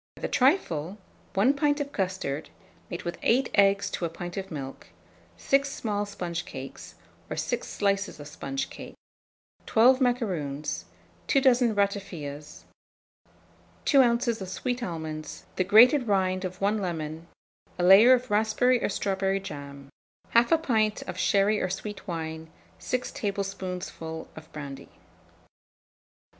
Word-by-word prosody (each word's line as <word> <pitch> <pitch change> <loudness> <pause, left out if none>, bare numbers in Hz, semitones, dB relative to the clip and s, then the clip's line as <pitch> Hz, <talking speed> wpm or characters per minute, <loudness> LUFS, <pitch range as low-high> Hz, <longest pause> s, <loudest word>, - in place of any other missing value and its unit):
For - - -14
the - - +1
trifle, 210 - +1 0.4
1 220 +8 +4
pint 290 +1 +1
of 285 -1 -3
custard, 185 - -3 0.4
made 175 - -5
with 175 - -5
8 250 +2 +2
eggs 200 0 +4
to - - -4
a - - -2
pint 175 +1 -7
of 195 -1 -5
milk; 135 -4 -7 0.5
6 275 0 +2
small 205 -5 -2
sponge 175 -4 -4
cakes, 135 -5 -9 0.3
or - - -3
6 - - -2
slices 200 -2 -1
of 145 - -8
sponge 270 - -4
cake; - - -10 0.7
12 255 +4 +5
macaroons, 180 - -1 0.4
2 275 - +4
dozen 245 -4 +4
ratafias, 180 -8 -3 1.2
2 275 -2 +6
oz. 235 -2 +1
of 190 - -5
sweet 245 +6 -3
almonds, 160 -6 -5
the 185 - +2
grated 245 +7 +6
rind 185 -2 +1
of 185 0 -6
1 205 +2 +1
lemon, 165 -3 -4 0.5
a 175 - -1
layer 200 +8 +8
of 250 -3 0
raspberry 220 +4 +2
or - - +1
strawberry 195 -1 0
jam, 140 -6 -9 0.4
1/2 240 +8 +4
pint 220 -7 +1
of - - -6
sherry 205 +1 +3
or 185 - 0
sweet 200 +2 -6
wine, 160 -2 -5 0.3
6 255 0 -2
tablespoonfuls 185 -5 -4
of 160 0 -12
brandy. 140 -3 -8
195 Hz, 135 wpm, -27 LUFS, 165-235 Hz, 1.2 s, layer